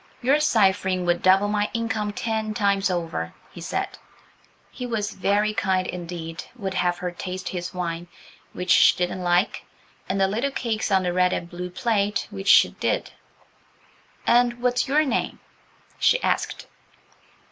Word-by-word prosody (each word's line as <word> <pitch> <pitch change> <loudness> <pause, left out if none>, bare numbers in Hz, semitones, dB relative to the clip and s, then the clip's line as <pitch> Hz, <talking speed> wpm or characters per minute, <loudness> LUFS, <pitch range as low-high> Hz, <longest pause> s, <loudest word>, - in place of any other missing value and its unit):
"Your 275 +4 +4
ciphering 190 -8 +2
would 175 0 +1
double 190 +2 +4
my 210 0 0
income 220 -2 -1
ten 220 0 -2
times 200 -2 +2
over," 165 - -3 0.2
he - - -10
said. - - -3 0.7
He 250 - -6
was 210 -3 -2
very 205 +3 +1
kind 190 -4 0
indeed–would 175 +4 -6
have 175 -1 0
her 180 0 -4
taste 185 +1 -5
his 175 -2 -4
wine, 175 -1 -4 0.4
which 180 0 -3
she - - +6
didn't 180 +1 -2
like, 175 +4 +1 0.5
and 195 - 0
the 195 - +4
little 230 +8 -1
cakes 230 -6 -2
on 190 -2 +3
the 175 -1 -1
red 180 0 +3
and 170 - -3
blue 180 +1 -6
plate, 205 +2 0
which 195 -1 -7
she 205 - +7
did. - - -2 1.1
"And 240 0 +3
what's 250 0 +1
your 300 +3 +3
name?" 270 - -1 0.6
she - - +4
asked. - - -1
195 Hz, 150 wpm, -24 LUFS, 180-220 Hz, 1.1 s, she